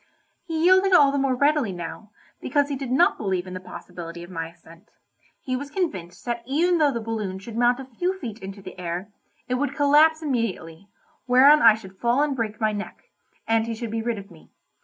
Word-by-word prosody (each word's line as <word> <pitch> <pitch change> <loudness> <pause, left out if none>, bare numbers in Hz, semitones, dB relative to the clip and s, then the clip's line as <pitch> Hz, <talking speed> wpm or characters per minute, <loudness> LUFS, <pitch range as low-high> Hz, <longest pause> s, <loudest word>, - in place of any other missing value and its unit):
He 325 -1 -2
yielded 375 +2 +5
all 285 -5 +7
the 280 - 0
more 270 -1 +1
readily 285 -4 +2
now, 175 +4 -7 0.3
because 285 +2 +1
he 280 - -2
did 270 -2 -5
not 265 +7 +3
believe 190 -3 -1
in 185 - -8
the 185 - -5
possibility 170 -2 -9
of 175 - -12
my 165 -2 -4
ascent; 165 +3 -18 0.5
he 255 - -2
was 280 +2 -5
convinced 195 - -4
that 240 -1 -2
even 335 +6 +2
though 295 -2 +4
the 235 - -3
balloon 215 -4 -4
should 215 +4 -9
mount 245 +2 +3
a 270 - -7
few 355 +10 -2
feet 235 - -7
into 195 -1 -9
the 185 0 -10
air, 175 +3 -4 0.4
it 250 - -2
would 285 -1 -1
collapse 310 +2 +4
immediately, 200 - -3 0.4
whereon 275 +4 +7
I 225 -2 +8
should 190 -3 -13
fall 245 +4 +2
and 290 -2 -1
break 220 -3 -3
my 215 -1 +1
neck, 205 0 -7 0.4
and 225 0 +2
he 230 - -3
should 230 -1 -5
be 225 0 -2
rid 230 0 -2
of 200 -1 -10
me. 165 - -17
235 Hz, 215 wpm, -24 LUFS, 190-285 Hz, 0.5 s, I